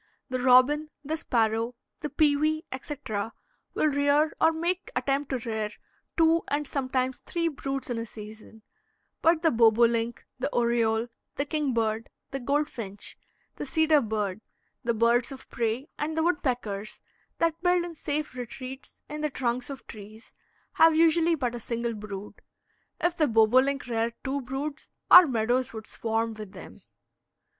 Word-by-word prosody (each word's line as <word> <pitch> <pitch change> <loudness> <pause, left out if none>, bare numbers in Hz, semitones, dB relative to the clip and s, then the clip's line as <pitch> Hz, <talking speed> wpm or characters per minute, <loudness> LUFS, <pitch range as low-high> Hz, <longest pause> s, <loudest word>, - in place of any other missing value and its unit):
The 255 - 0
robin, 260 +5 +5 0.2
the 310 +3 -1
sparrow, 230 -5 0 0.2
the 300 - -4
pewee, 310 +1 +2
etc., 255 -6 -4 0.4
will - - +2
rear, 285 +1 +3
or 320 - +6
make 345 +3 -2
the - - -12
attempt 280 +1 0
to 265 - 0
rear, 220 -2 -1 0.5
two 330 0 +4
and 290 0 -1
sometimes 260 -2 -1
three 335 -1 -1
broods 275 -2 -4
in 240 -2 -2
a 230 - -3
season; 215 0 -11 0.6
but 330 0 +3
the 325 - +4
bobolink, 230 0 +3
the - - -1
oriole, 235 -1 +1 0.3
the 280 - -1
kingbird, 235 -7 -1 0.2
the 270 - -3
goldfinch, 245 -7 -2 0.4
the - - -4
cedar 315 -2 +4
bird, 210 -3 -2 0.4
the 235 -1 0
birds 235 +3 +3
of 270 - -10
prey, 235 +4 -1
and 310 +2 -2
the 320 - +2
woodpeckers, 245 - -1 0.4
that 330 0 0
build 355 -1 +3
in 345 - -7
safe 300 -1 -3
retreats, 255 +2 -8
in 300 +1 -6
the 300 - 0
trunks 250 -2 -2
of 275 -2 -8
trees, 215 +1 -12 0.4
have 325 -1 +6
usually 330 +1 +4
but 250 -5 -2
a 240 - -5
single 235 +1 -2
brood. 205 -1 -8 0.6
If 345 0 0
the 310 - +3
boblink 255 +5 +3
reared 230 -1 -1
two 275 +1 -2
broods, 275 +4 -5 0.2
our 360 -2 +11
meadows 245 0 0
would 220 -1 -7
swarm 225 0 -2
with 215 -2 -9
them. 185 - -11
255 Hz, 150 wpm, -27 LUFS, 225-300 Hz, 0.6 s, our